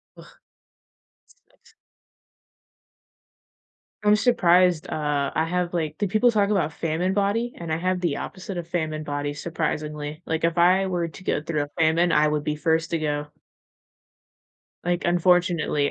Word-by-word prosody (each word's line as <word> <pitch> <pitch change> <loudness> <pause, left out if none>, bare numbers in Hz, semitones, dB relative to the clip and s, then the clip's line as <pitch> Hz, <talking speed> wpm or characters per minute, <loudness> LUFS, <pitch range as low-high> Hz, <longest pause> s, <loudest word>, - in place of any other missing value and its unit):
Ugh, - - -16 0.9
sucks. - - -27 2.3
I'm 210 0 +4
surprised, 180 -7 +3
uh, 145 -2 -1
I 160 - +2
have, 175 +1 -2
like 155 -3 -2
do 205 -1 0
people 215 +5 +3
talk 205 -2 +2
about 175 -7 +1
famine 165 +4 -1
body 210 +4 0
and 170 -2 -6
I - - +2
have 185 +1 -1
the 170 -5 -1
opposite 185 0 -6
of 170 - -4
famine 155 -3 -2
body 145 0 -3
surprisingly, 150 -1 -4
like, 160 0 -1
if 165 +1 -1
I 185 +3 +4
were 175 -2 -1
to 185 - -13
go 150 - 0
through 155 -2 -1
a 145 - -9
famine, 165 +2 +3
I 150 0 +4
would 150 -1 -2
be 150 - -1
first 160 +1 0
to 165 - +1
go. 150 -1 -2 1.6
Like, 175 0 0
unfortunately 175 -4 +2
170 Hz, 150 wpm, -24 LUFS, 155-185 Hz, 2.3 s, I'm